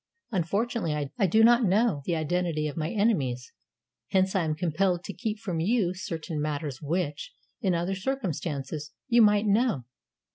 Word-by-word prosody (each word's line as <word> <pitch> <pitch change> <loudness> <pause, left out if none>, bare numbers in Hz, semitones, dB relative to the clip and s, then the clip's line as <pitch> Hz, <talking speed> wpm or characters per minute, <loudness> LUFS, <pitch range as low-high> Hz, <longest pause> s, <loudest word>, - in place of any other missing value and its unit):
Unfortunately, 175 - -1
I 195 - +4
do 220 +6 +4
not 240 +2 +6
know 205 -4 +2
the 170 - 0
identity 160 -1 0
of 145 - -5
my 160 0 -2
enemies; 145 - 0 0.6
hence 190 +1 +2
I 180 -3 +2
am 155 -1 -1
compelled 175 +2 0
to 200 - -6
keep 220 -1 -3
from 185 -6 -3
you 190 0 +1
certain 165 -4 -4
matters 145 -3 -3
which, 150 -1 -3 0.3
in 185 -4 +1
other 175 +3 -1
circumstances, 160 - -3
you 240 -2 +5
might 210 -1 +5
know. 210 - +2
180 Hz, 155 wpm, -27 LUFS, 155-210 Hz, 0.6 s, not